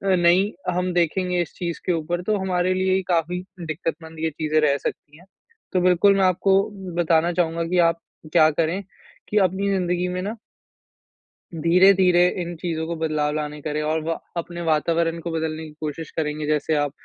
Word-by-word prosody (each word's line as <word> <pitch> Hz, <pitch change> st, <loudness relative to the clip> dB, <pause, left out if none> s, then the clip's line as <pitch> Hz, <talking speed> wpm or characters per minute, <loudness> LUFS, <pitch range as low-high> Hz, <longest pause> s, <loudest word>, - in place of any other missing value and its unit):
नहीं 180 Hz, +3 st, +3 dB, 0.2 s
हम 180 Hz, +1 st, -1 dB
देखेंगे 180 Hz, +1 st, +1 dB
इस 170 Hz, -, -5 dB
चीज़ 170 Hz, -2 st, -4 dB
के 180 Hz, -, +2 dB
ऊपर 170 Hz, +2 st, -2 dB
तो 215 Hz, -1 st, +2 dB
हमारे 185 Hz, -1 st, 0 dB
लिए 185 Hz, 0 st, +1 dB
ही 190 Hz, -, +1 dB
काफ़ी 175 Hz, +1 st, 0 dB, 0.3 s
दिक्कत 160 Hz, +1 st, -2 dB
मंद 160 Hz, 0 st, -11 dB
ये 160 Hz, 0 st, 0 dB
चीज़ें 155 Hz, +1 st, 0 dB
रह 140 Hz, -2 st, +3 dB
सकती 150 Hz, +1 st, -6 dB
है। 175 Hz, -, -18 dB, 0.5 s
तो 185 Hz, -, +2 dB
बिल्कुल 185 Hz, +2 st, +4 dB
मैं 195 Hz, -, +3 dB
आपको 190 Hz, +2 st, +3 dB, 0.4 s
बताना 165 Hz, +1 st, +2 dB
चाहूँगा 170 Hz, -1 st, 0 dB
कि 180 Hz, +1 st, +1 dB
आप 165 Hz, 0 st, -4 dB, 0.3 s
क्या 155 Hz, -2 st, +6 dB
करें 165 Hz, +5 st, 0 dB, 0.5 s
कि 210 Hz, -, 0 dB
अपनी 190 Hz, +1 st, +2 dB
ज़िंदगी 180 Hz, -2 st, 0 dB
में 180 Hz, 0 st, -3 dB
ना 205 Hz, +4 st, -4 dB, 1.2 s
धीरे-धीरे 180 Hz, +2 st, +5 dB
इन 175 Hz, 0 st, -5 dB
चीज़ों 160 Hz, -1 st, -3 dB
को 170 Hz, -, -3 dB
बदलाव 155 Hz, -2 st, -1 dB
लाने 150 Hz, 0 st, -4 dB
करें 150 Hz, +1 st, -2 dB
और 155 Hz, +1 st, 0 dB
वा 165 Hz, +1 st, -1 dB, 0.2 s
अपने 170 Hz, +1 st, -5 dB
वातावरण 165 Hz, +2 st, +1 dB
को 170 Hz, -, -4 dB
बदलने 160 Hz, -1 st, -3 dB
की 155 Hz, -, -10 dB
कोशिश 155 Hz, +1 st, -5 dB
करेंगे 150 Hz, -1 st, -2 dB
जैसे 150 Hz, +1 st, +1 dB
आप 145 Hz, -1 st, 0 dB
170 Hz, 185 wpm, -23 LUFS, 155-180 Hz, 1.2 s, क्या